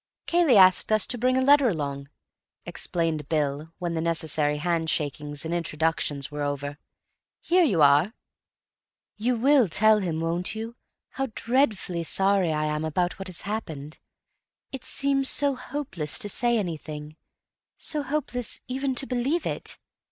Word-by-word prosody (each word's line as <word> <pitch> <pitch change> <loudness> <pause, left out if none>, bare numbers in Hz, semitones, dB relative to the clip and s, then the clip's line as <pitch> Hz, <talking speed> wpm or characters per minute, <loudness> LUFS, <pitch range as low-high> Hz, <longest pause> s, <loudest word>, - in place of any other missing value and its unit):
"Cayley 335 -9 +4
asked 185 +2 +6
us 215 -2 +3
to 245 - -3
bring 255 +2 +2
a 260 - +2
letter 280 -2 +5
along," 140 -5 -4 0.6
explained 160 -4 -2
Bill, 150 0 -1
when 175 -2 -3
the 160 - -1
necessary 160 -3 0
handshakings 150 -2 -2
and 165 - -3
introductions 160 -4 -1
were 145 0 -5
over. 145 0 -3 0.6
"Here 360 +1 +3
you 185 - +3
are." 145 +10 +4 1.0
"You 240 +4 0
will 260 0 +4
tell 215 +5 +4
him, 170 -5 -2
won't 170 +5 -1
you, 225 +2 -6 0.3
how 270 0 -3
dreadfully 220 -9 0
sorry 195 0 +2
I 155 0 0
am 150 0 -2
about—about 175 +4 -1
what 195 - -6
has 185 -3 -7
happened? 160 -8 -6 0.7
It 265 - -7
seems 275 -1 +1
so 285 -1 +3
hopeless 255 - -3
to 205 - 0
say 240 +3 +2
anything; 155 -5 -5 0.6
so 300 - -1
hopeless 265 -4 -3
even 265 +1 -2
to 270 - +2
believe 265 +7 -1
it. - - -4
180 Hz, 145 wpm, -26 LUFS, 155-250 Hz, 1.0 s, asked